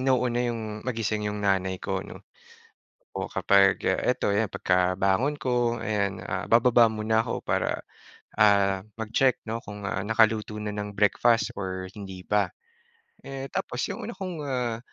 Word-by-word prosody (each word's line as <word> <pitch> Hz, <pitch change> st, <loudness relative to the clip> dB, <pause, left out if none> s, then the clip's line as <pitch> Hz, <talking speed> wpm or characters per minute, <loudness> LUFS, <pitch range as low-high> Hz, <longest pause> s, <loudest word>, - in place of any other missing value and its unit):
nauuna 125 Hz, -2 st, +1 dB
yung 110 Hz, -2 st, -4 dB
magising 110 Hz, -3 st, -2 dB
yung 105 Hz, -, -4 dB
nanay 95 Hz, -1 st, +1 dB
ko -, -, -3 dB
'no. -, -, -11 dB, 0.9 s
O -, -, -2 dB
kapag, 100 Hz, 0 st, +3 dB
ah, -, -, +2 dB
eto -, -, +1 dB
'yan 100 Hz, +2 st, +2 dB
pagkabangon 95 Hz, +9 st, +1 dB
ko 120 Hz, -2 st, 0 dB
ayan, 100 Hz, -3 st, -1 dB
ah, 95 Hz, -1 st, -3 dB
bababa 120 Hz, +1 st, +5 dB
muna 110 Hz, 0 st, +1 dB
ako -, -, -3 dB
para, -, -, -1 dB, 0.6 s
ah, 100 Hz, -2 st, +4 dB, 0.2 s
mag-check 115 Hz, +4 st, +2 dB
'no 115 Hz, -, -1 dB
kung, 105 Hz, -1 st, -6 dB
ah, 95 Hz, 0 st, -2 dB
nakaluto 110 Hz, -1 st, +2 dB
na 105 Hz, -, -4 dB
ng 105 Hz, 0 st, -4 dB
breakfast 115 Hz, +3 st, +3 dB
or 95 Hz, -1 st, -4 dB
hindi 95 Hz, -2 st, -8 dB
pa. 105 Hz, +3 st, 0 dB, 0.7 s
Eh, 135 Hz, -1 st, -6 dB
tapos 125 Hz, -, -3 dB
yung -, -, -5 dB
una 235 Hz, -, -6 dB
kong, 185 Hz, -3 st, -5 dB
ah, 125 Hz, -4 st, -1 dB
110 Hz, 155 wpm, -26 LUFS, 100-120 Hz, 0.9 s, bababa